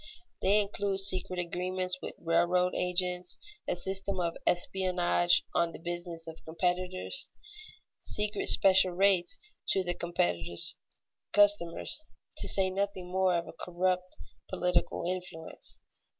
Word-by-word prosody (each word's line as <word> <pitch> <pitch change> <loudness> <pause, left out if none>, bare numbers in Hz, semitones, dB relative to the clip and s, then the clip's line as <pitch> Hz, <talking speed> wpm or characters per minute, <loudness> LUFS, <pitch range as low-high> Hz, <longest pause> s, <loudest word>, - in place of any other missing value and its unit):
They 205 +2 +4
include 200 -1 -1
secret 185 -2 0
agreements 180 +1 -2
with - - -7
railroad 175 +2 +1
agents, 180 0 -1 0.3
a - - 0
system 190 +1 -2
of 170 -1 -1
espionage 175 -1 +2
on 170 -1 +1
the - - -8
business 175 -1 -6
of 165 0 -11
competitors, 180 - -2 0.7
secret 210 0 -2
special 190 -1 +7
rates 185 -1 +2 0.3
to 190 - +2
the 175 -1 -1
competitor's 85 - +2 0.6
customers, 205 - +3 0.4
to - - -1
say 190 -1 +3
nothing 190 -2 -3
more 185 -1 +2
of 170 - -6
corrupt 180 +1 -2 0.3
political 180 -1 -1
influence. 180 -3 -6
180 Hz, 115 wpm, -30 LUFS, 175-190 Hz, 0.7 s, special